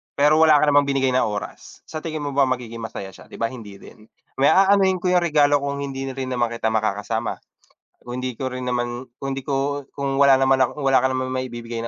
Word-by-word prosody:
pero 150 +2 +4
wala 160 -1 +6
ka 145 - +4
namang 145 0 +4
binigay 135 -2 +1
na 125 -1 +2
oras, 105 -1 -7
sa 155 - -7
tingin 155 -1 -5
mo 145 - -3
ba 140 -1 +2
magiging 120 -3 -4
masaya 100 -3 -7
siya? 95 - -16
'Di - - -12
ba, 115 0 -2
hindi 110 -6 -10
rin. 105 +2 -16 0.3
Me 140 - +5
aanuhin 190 -1 +4
ko 180 - +1
yang 180 - +4
regalo 150 -4 +3
kung 140 0 -3
hindi 135 -1 -5
rin 130 -1 -4
naman 120 -1 +1
kita 115 -1 -2
makakasama, 110 +1 -2 0.6
kung 125 +1 -6
hindi 130 -1 -4
ko 130 +2 -4
rin 125 0 -5
naman 120 0 -3
kung 135 +1 -5
di 135 -1 -6
ko 140 0 -2
kung 140 -1 -2
wala 140 -1 +7
naman 135 0 +3
ako 130 +3 0
wala 135 -1 +4
ka 130 - +2
naman 130 0 -2
maibibigay 120 -2 -5
130 Hz, 225 wpm, -22 LUFS, 120-140 Hz, 0.6 s, wala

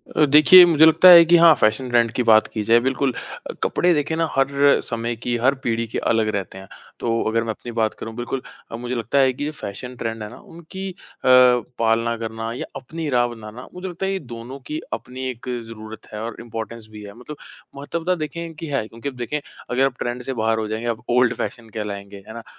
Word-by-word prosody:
अ, 155 - +5
देखिए 155 +5 +8
मुझे 160 -2 +5
लगता 160 +3 +7
है 170 -1 +11
कि 175 +1 +5
हाँ, 165 -1 +7
फैशन 110 +3 +1
ट्रेंड 120 -2 +2
की 125 - -1
बात 110 -2 +5
की 110 - -4
जाए 115 +2 +4
बिल्कुल 130 +1 -1 0.4
अ, - - -4
कपड़े 180 0 +2
देखें 150 +1 -1
ना 165 -1 +1
हर 140 +1 +3
समय 115 0 -3
की, 120 +1 -3
हर 130 +4 +2
पीढ़ी 115 0 -1
के - - -5
अलग 110 -1 +1
रहते 95 -1 -5
हैं। 95 0 -11 0.3
तो 115 -1 -1
अगर 115 +1 0
मैं 115 - -6
अपनी 120 +2 -9
बात 110 -1 +1
करूँ 110 - -7
बिल्कुल 125 +2 -4 0.3
अ, - - -5
मुझे 120 +2 -5
लगता 120 +4 0
है 130 -1 +3
कि 130 - -6
ये 150 - -3
फैशन 125 -2 -8
ट्रेंड 115 -2 -5
है 105 - -7
ना - - -12
उनकी 180 +4 -9
अ, - - -16 0.3
पालना 120 -2 +3
करना 115 0 -5
या 120 - -5
अपनी 160 +4 -6
राय् 120 -2 +2
बनाना, 115 +1 -10
मुझे 180 +1 -7
लगता 180 +1 -5
है 190 - -1
ये 195 - -2
दोनों 120 -1 -9
की 155 +1 -4
अपनी 125 +3 -5
एक 125 0 -8 0.2
ज़रूरत 110 -1 -10
है 105 - -5
और 115 -1 -6
इंपोर्टेन्स 115 -1 -7
भी 105 -1 -10
है, 100 -1 -10
मतलब 125 +6 -11 0.4
महत्वता 165 +6 -2
देखें 160 0 -5
इनकी 165 -1 -8
है 135 -7 -2
क्योंकि 115 +5 -6
अब 135 - -13
देखें, 125 +4 -3 0.3
अगर 130 +2 +2
आप 135 -2 -3
ट्रेंड 120 +1 -3
से 135 - -4
बाहर 110 -1 0
हो 110 - -3
जाएँगे, 110 +2 -4
आप 110 -1 -3
ओल्ड 125 0 +3
फैशन 115 -2 -6
कहलाएँगे, 100 -2 -6
है 110 - -9
ना? 115 0 -9
120 Hz, 230 wpm, -21 LUFS, 115-145 Hz, 0.4 s, है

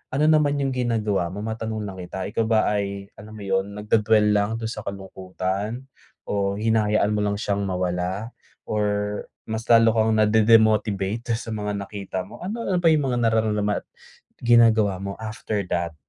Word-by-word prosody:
ano 150 - +2
naman 145 -2 +3
yung 135 - 0
ginagawa 110 -7 0
mo? 100 +5 -6
Matanong 110 -1 -4
lang 95 -2 -7
kita, 90 +1 -5
ikaw 110 +2 -1
ba 110 -1 +3
ay 100 -1 -3
alam 110 +2 -11
mo 105 - -9
yun, 95 +1 -1
nagdwe-dwell 105 0 +3
lang 105 +2 +1
dun 115 0 -4
sa - - -6
kalungkutan 95 +3 -4 0.4
o 100 -1 -1
hinahayaan 105 -1 +2
mo 105 - 0
lang 105 0 0
siyang 100 -1 -2
mawala? 90 +4 -2 0.3
Or 105 -1 -1 0.6
mas 110 +1 -5
lalo 115 -1 +6
kang 110 0 +2
nade-demotivate 110 0 +3
dun - - -4
sa 115 - -7
mga 105 -1 -3
nakita 100 -2 -5
mo? 95 - -12
Ano 215 +6 -4
ano 185 -4 0
pa 175 - +2
yung 150 -5 +3
mga 120 - 0
nararamdaman 105 -2 0
at - - -50 0.6
ginagawa 115 -5 +4
mo 100 +1 -5
after 110 -1 -3
that? 85 -1 -1
105 Hz, 170 wpm, -24 LUFS, 100-115 Hz, 0.6 s, lalo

